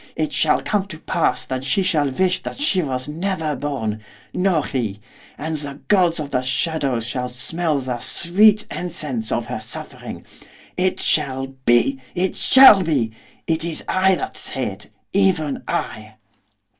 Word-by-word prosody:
it - - -2
shall - - +2
come 200 -2 0
to 165 -5 -8
pass 165 +1 0
that 130 0 -4
she 140 +9 +1
shall 155 -6 +2
wish 180 +7 0
that - - -7
she 210 -11 +2
was 130 -4 -3
never 160 -1 -2
born, 120 -6 -3 0.3
nor 180 -5 +1
he! 110 -7 -3 0.4
and 155 +1 -3
the 140 -1 -6
gods 180 -5 +3
of 145 -2 -5
the 125 - +1
shadows 130 -2 -1
shall 125 +1 -3
smell 155 +5 -2
the 125 -2 -3
sweet 210 - +3
incense 150 -10 -4
of - - 0
her - - -5
suffering! - - -9 0.5
It 185 +1 0
shall 135 -3 +1 0.2
be! 130 +3 +3
it 185 +1 0
shall 260 -7 +8
be! 140 -10 0 0.3
It 160 -1 0
is 170 -1 -3
I 190 0 +3
that - - -5
say - - -3
it, - - -11 0.2
even 180 -8 +1
I! 110 0 -4
155 Hz, 155 wpm, -21 LUFS, 130-185 Hz, 0.5 s, shall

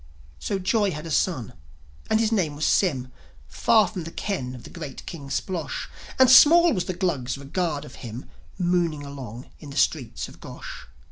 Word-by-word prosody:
So 200 - -2
Joi 200 +2 +2
had 150 -2 -5
a 165 - -5
son, 145 - 0 0.6
and 220 - +3
his 225 -1 +2
name 175 -9 +1
was 150 - -1
Sym; 135 -10 +2 0.4
Far 220 -4 +4
from 180 -2 -5
the 165 - -6
ken 130 -13 -3
of 125 - -11
the - - -11
great 155 -6 -8
King 145 -5 -8
Splosh. 165 -4 -3 0.3
And 260 - +7
small 325 +6 +8
was 180 - -1
the 185 - -3
Glugs' 145 -10 -1
regard 145 +2 -2
of - - -12
him, 120 +2 -7 0.3
Mooning 175 -5 +1
along 130 -4 -8
in 150 - -10
the 140 - -7
streets 135 -4 0
of - - -15
Gosh. - - -9
165 Hz, 185 wpm, -25 LUFS, 140-190 Hz, 0.6 s, small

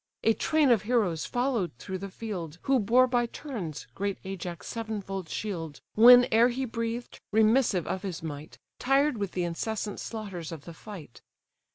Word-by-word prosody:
A 225 - +5
train 305 +2 +2
of 225 -5 +4
heroes 210 -8 0
followed 245 - 0
through 190 +8 -5
the 195 +1 -6
field, 185 -7 -6
Who 270 -1 +3
bore 240 +5 +5
by 245 -1 +1
turns 215 - -6
great 200 0 -2
Ajax' 180 -2 -6
sevenfold 200 -6 -5
shield; 165 -8 -4
Whene'er 240 0 +8
he 260 +2 -2
breathed, 230 0 -4
remissive 220 - +3
of 190 - -3
his 185 -5 -5
might, 150 -1 -7 0.2
Tired 275 +1 +3
with 200 -2 -3
the 180 - -1
incessant 205 +4 -3
slaughters 195 -8 -6
of 155 -4 -8
the 170 - -8
fight. 165 - -11
210 Hz, 160 wpm, -28 LUFS, 180-240 Hz, 0.2 s, Whene'er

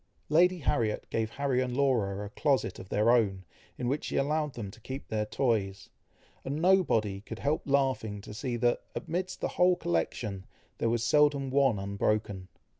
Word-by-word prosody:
Lady 180 +4 +4
Harriet 115 -8 0
gave 110 -1 0
Harry 135 0 0
and 125 0 -2
Laura 105 -8 +1
a - - -7
closet 135 -6 0
of 95 - -10
their 105 +3 +3
own, 100 -6 +2 0.3
in 125 - -3
which 140 +4 -1
she - - -4
allowed 150 0 0
them 105 -5 -5
to 115 - -16
keep 130 +4 -7
their 105 -1 -1
toys, 105 -5 -1 0.5
and 140 - -3
nobody 155 - +2
could 115 +1 -8
help 145 +6 0
laughing 130 -7 +1
to 105 - -10
see 120 +3 -3
that, 120 +1 +1
amidst 180 +3 -3
the - - +1
whole 180 0 +3
collection, 95 - -2 0.3
there 115 - +1
was 115 0 0
seldom 145 0 +3
one 135 -5 +3
unbroken. 100 -1 -1
120 Hz, 175 wpm, -29 LUFS, 105-140 Hz, 0.5 s, Lady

